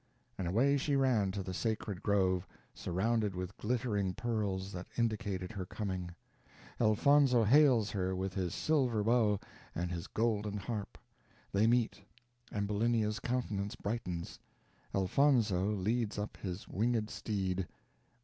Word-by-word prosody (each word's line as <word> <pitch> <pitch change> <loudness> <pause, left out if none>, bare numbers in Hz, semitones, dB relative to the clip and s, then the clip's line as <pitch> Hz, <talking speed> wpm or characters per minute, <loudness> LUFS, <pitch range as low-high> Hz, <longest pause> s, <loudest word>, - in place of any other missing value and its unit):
And 95 - -3
away 130 +10 +3
she 140 +1 0
ran 125 -8 +3
to 100 -1 -3
the 95 0 -5
sacred 105 -2 -2
grove, 95 -3 +2 0.3
surrounded 105 +2 0
with 90 +2 -5
glittering 105 -5 -1
pearls, 105 -5 -2
that 90 -1 -6
indicated 105 -5 -1
her 100 -4 -4
coming. 95 -4 -3 0.7
Elfonzo 125 +3 +5
hails 125 -2 +5
her 95 -1 -1
with 95 0 -2
his 90 -3 -2
silver 130 -9 +1
bow 110 -3 +3 0.4
and 85 +1 -2
his 85 -1 -4
golden 105 -2 0
harp. 105 0 -5 0.5
They 105 +3 +3
meet 120 -3 +2 0.5
Ambulinia's 105 +1 0
countenance 105 -6 -2
brightens 90 -6 -4 0.5
Elfonzo 105 -2 +3
leads 105 +2 0
up 105 +1 -4
his 90 0 -5
winged 110 +1 0
steed. 95 -4 -2
105 Hz, 125 wpm, -33 LUFS, 95-115 Hz, 0.7 s, Elfonzo